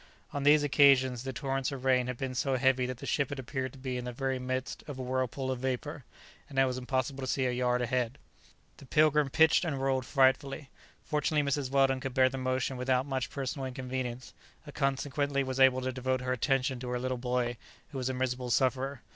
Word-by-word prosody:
On 145 - -2
these 145 +1 +5
occasions 135 -4 +4
the 130 +1 -4
torrents 135 +1 -2
of 135 -2 -6
rain 125 -1 +3
had 125 -1 -4
been 130 0 -3
so 130 +1 0
heavy 130 -1 +2
that 130 -1 -5
the - - -8
ship 140 -3 0
had 140 - -5
appeared 130 0 -4
to - - -13
be 130 -1 -4
in 125 - -5
the 125 - -3
very 130 +1 -2
midst 130 +1 -4
of 145 -3 -6
a - - -5
whirlpool 130 +1 -2
of 130 - -3
vapour, 130 +2 -3 0.4
and 135 - -9
it 135 - +5
was 130 -1 -2
impossible 130 +1 -2
to 130 - -3
see 130 0 0
a 125 - +1
yard 125 0 +1
ahead. 125 +1 -1 0.6
The 140 - -14
"Pilgrim" 150 0 +3
pitched 160 +5 +4
and 150 -6 -2
rolled 130 -1 0
frightfully. 135 +1 +2 0.3
Fortunately 150 0 0
Mrs. 140 -1 0
Weldon 135 -1 +3
could 135 -1 -5
bear 130 -1 +5
the 135 0 -5
motion 130 0 -1
without 130 +1 +1
much 135 -3 -2
personal 135 -1 -4
inconvenience, 130 -1 -5 0.3
and 145 - -10
consequently 140 +1 0
was 130 0 -4
able 130 -1 +5
to 130 0 -2
devote 130 0 -1
her 125 0 -1
attention 130 +1 0
to 125 0 -5
her 125 0 -1
little 130 0 -2
boy, 125 -1 -1 0.3
who 140 - -5
was 130 0 -1
a - - -1
miserable 125 -1 -2
sufferer. 130 +2 0
130 Hz, 220 wpm, -30 LUFS, 125-135 Hz, 0.6 s, these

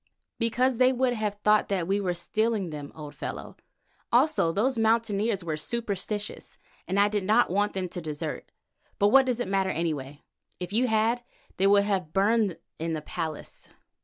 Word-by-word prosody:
"Because 245 +2 +1
they 255 +1 +5
would 255 -1 +1
have 215 -3 -2
thought 210 +1 +3
that 185 -4 -1
we 200 +2 +1
were 180 -2 -1
stealing 215 0 -1
them, 145 -2 -7
old 150 -2 -8
fellow. 145 - -6 0.6
Also 250 - +3
those 245 +9 +1
Mountaineers 220 -3 +1
were 160 -2 -2
superstitious, 210 +2 -3 0.3
and 190 +2 0
I 205 - +5
did 205 -1 -1
not 215 +1 +3
want 205 +2 +1
them 190 -1 -2
to 175 - -5
desert. 155 0 -5 0.5
But 205 0 +4
what 270 +3 +6
does 245 -2 0
it 245 - -2
matter, 195 0 +1
anyway? 150 -5 -3 0.4
If 180 +1 -6
you 245 +4 +3
had, 225 +2 +2 0.4
they 195 - +3
would 200 0 +5
have 195 -3 0
been 155 - -28
burned 200 -2 +2 0.2
in 165 +1 -2
the 155 - -3
palace." 155 0 -6
205 Hz, 180 wpm, -27 LUFS, 175-225 Hz, 0.6 s, what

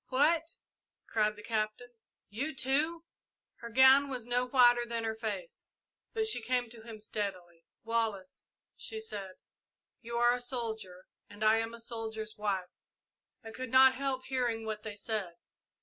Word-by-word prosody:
"What!" 320 +5 +2 0.5
cried 215 -1 +1
the 210 - -12
Captain; 220 +2 -2 0.4
"you, 275 +9 -3
too?" 300 +6 +1 0.5
Her 235 - -8
gown 265 +3 +7
was 250 -4 -3
no 245 +1 +1
whiter 245 -2 +6
than 235 -1 -3
her 225 0 -1
face, 210 -6 -6 0.4
but 445 -1 0
she 435 - +2
came 245 -1 0
to 230 -1 -11
him 220 -1 -9
steadily. 185 -6 -5 0.2
"Wallace," 225 -5 -2 0.3
she 440 - -6
said, 200 - -7 0.7
"you 235 0 -4
are 240 0 +5
a 245 - -3
soldier, 220 -7 -4 0.2
and 205 +1 -7
I 215 +1 +6
am 225 +1 -2
a - - -12
soldier's 220 -2 -5
wife. 195 -3 -2 0.7
I 225 - -8
could 255 +2 -6
not 260 +1 +7
help 265 -1 -2
hearing 240 -4 -1
what 215 -1 -4
they 215 -1 -7
said. 205 -5 -3
230 Hz, 155 wpm, -32 LUFS, 215-255 Hz, 0.7 s, gown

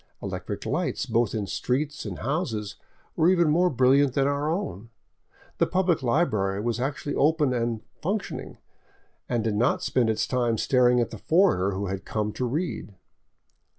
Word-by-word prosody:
Electric - - -5
lights - - -1
both 115 -1 0
in 105 -2 -1
streets 145 +8 -2
and 100 -4 -5
houses 115 - -2 0.4
were 160 - +4
even 170 -4 +3
more 180 +3 +3
brilliant 130 0 +3
than 135 -1 +3
our 145 +2 0
own; 115 - -3 0.7
the - - +3
public 180 -4 +1
library 110 - +1
was 115 +2 -1
actually 140 +2 -3
open 150 -2 +2
and 115 -2 -1
" - - -41
functioning," 195 +5 -3 0.7
and 120 -3 0
did 110 -2 0
not 120 +5 +1
spend 120 -3 +1
its 110 - 0
time 120 -3 0
staring 125 +1 +3
at 120 - 0
the 110 - -8
foreigner 160 - +3
who 100 +2 -3
had 95 0 -4
come 105 -1 -2
to 125 - -2
read. 140 - -3
125 Hz, 165 wpm, -26 LUFS, 110-150 Hz, 0.7 s, were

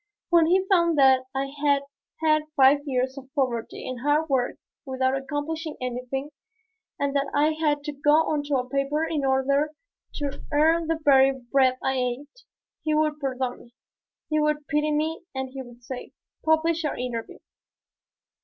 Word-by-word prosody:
When 335 -2 +5
he 375 +2 +3
found 340 -4 +3
that 265 -2 +5
I 270 +1 0 0.2
had 280 -1 +3 0.4
had 310 -1 +3
five 275 +1 +6
years 260 0 -1
of 265 -1 -15
poverty 245 -5 -2
and 255 -1 -5
hard 295 +4 +1
work 255 -3 +1 0.3
without 260 -2 0
accomplishing 295 +3 -4
anything, 255 +3 -4 0.7
and 280 0 -1
that 280 0 +1
I 295 +2 +4
had 310 - -7
had 295 -2 +1
to 295 - -3
go 295 +1 +2
onto 295 -2 +1
a 250 -1 -1
paper 275 +4 0
in 310 -3 -2
order 270 +2 +2 0.5
to 285 -2 -4
earn 320 +2 +3
the 325 0 0
very 270 -1 +6
bread 260 0 +1
I 265 0 0
ate, 265 - -4 0.4
he 310 -1 +1
would 305 -1 +1
pardon 260 -3 -2
me, 235 0 -19 0.5
he 310 0 +1
would 300 -1 0
pity 300 +1 +1
me 310 +2 -1
and 265 -1 -3
he 270 0 -6
would 245 -1 -13
say, 255 +1 -7 0.3
"Publish 320 +1 +2
your 300 - -1
interview." 240 -2 -5
280 Hz, 165 wpm, -25 LUFS, 265-305 Hz, 0.7 s, five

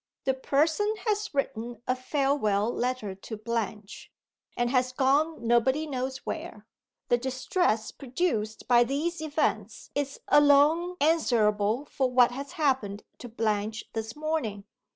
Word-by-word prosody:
The 265 - +1
Person 315 +11 +1
has 420 -1 0
written 240 -4 -3
a 255 - +2
farewell 255 -6 0
letter 245 -5 -2
to 205 +3 -8
Blanche, 215 -2 -4 0.5
and 240 0 +1
has 255 -1 +2
gone 280 +2 +1
nobody 240 +6 +2
knows 260 -2 -4
where. 315 -10 -6 0.4
The 240 - +3
distress 260 - 0
produced 245 -6 -2
by 240 -1 +6
these 310 +7 -2
events 310 0 -2
is 280 -1 -3
alone 295 +5 +5
answerable 235 -6 +2
for 265 -3 -1
what 250 -1 +5
has 275 +3 -7
happened 255 -9 0 0.2
to 245 - -8
Blanche 220 -1 -1
this 225 0 -4
morning. 300 -10 -2
255 Hz, 130 wpm, -28 LUFS, 225-295 Hz, 0.5 s, by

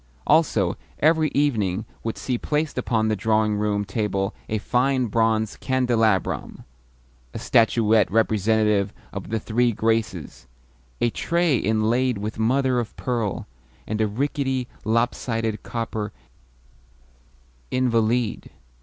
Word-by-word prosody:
Also, 135 - +2 0.2
every 155 0 +3
evening 110 -9 +1 0.2
would 115 - -3
see 125 - -2
placed 150 +5 -1
upon 110 -3 0
the 110 - +1
drawing 110 +1 +1
room 105 -1 0
table 100 -1 -1 0.2
a 110 - 0
fine 130 +4 +1
bronze 110 -1 +1
candelabrum, 120 -7 0 0.7
a - - -2
statuette 110 -2 +3
representative 110 -1 +2 0.2
of - - -6
the 110 +1 -1
Three 120 +3 +1
Graces, 110 -6 -2 0.5
a 120 - +2
tray 170 0 +1
inlaid 115 +3 +1
with 105 +2 -5
mother 130 +2 +2
of 115 -2 -5
pearl, 115 -6 -2 0.4
and 110 +1 -2
a 110 - +3
rickety, 130 +2 -1 0.2
lop 115 +2 +2
sided 115 -3 -3
copper 110 -3 -4 1.6
invalide. 120 -2 0
115 Hz, 115 wpm, -23 LUFS, 105-125 Hz, 1.6 s, every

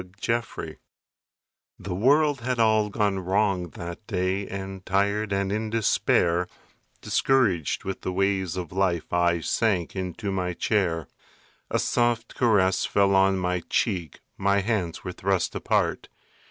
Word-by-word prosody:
MY - - -18
COMFORTER 110 -9 -3 1.0
The 95 - -5
world 140 - +3
had 125 +1 -1
all 110 -2 +3
gone 100 -2 0
wrong 95 -1 0
that 85 +5 -7
day 95 -1 -1
And 95 -1 -6
tired 100 +2 0
and 100 0 0
in 110 +1 -2
despair, 90 -5 +2 0.5
Discouraged 110 - +1
with 95 0 -5
the - - -3
ways 95 -1 0
of 90 -4 -5
life, 90 -3 -1
I 85 -1 +2
sank 95 -4 0
into 95 +3 -4
my 90 -2 -1
chair. 85 -8 0 0.6
A - - +1
soft 120 -1 0
caress 95 -6 +2
fell 100 -1 +2
on 95 0 +4
my 90 -1 0
cheek, 90 - -1 0.2
My 100 +1 +2
hands 100 -6 -2
were 90 - -4
thrust 95 0 -1
apart. - - 0
95 Hz, 140 wpm, -25 LUFS, 90-105 Hz, 1.0 s, on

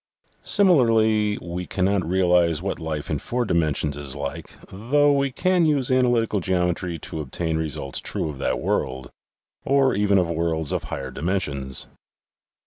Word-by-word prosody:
Similarly 110 - +3
we 90 +1 -5
cannot 95 0 0
realize 90 -3 +3
what 95 +1 -4
life 80 -3 -4
in - - 0
four 120 0 -2
dimensions 75 -5 0
is 70 -2 -3
like, 70 -1 -6
though 145 +9 +2
we 140 0 +1
can 185 +6 +1
use 145 -5 +1
analytical 120 -4 +2
geometry 90 -1 -1
to 80 - -6
obtain 80 +3 -2
results 75 -4 -2
true - - -2
of 75 -3 -7
that - - -1
world, 65 -1 -2 0.5
or 135 0 +3
even 100 0 +2
of 90 -2 +2
worlds 80 -2 -1
of - - -2
higher 65 -1 -5
dimensions. 70 -5 -1
90 Hz, 145 wpm, -23 LUFS, 80-115 Hz, 0.5 s, Similarly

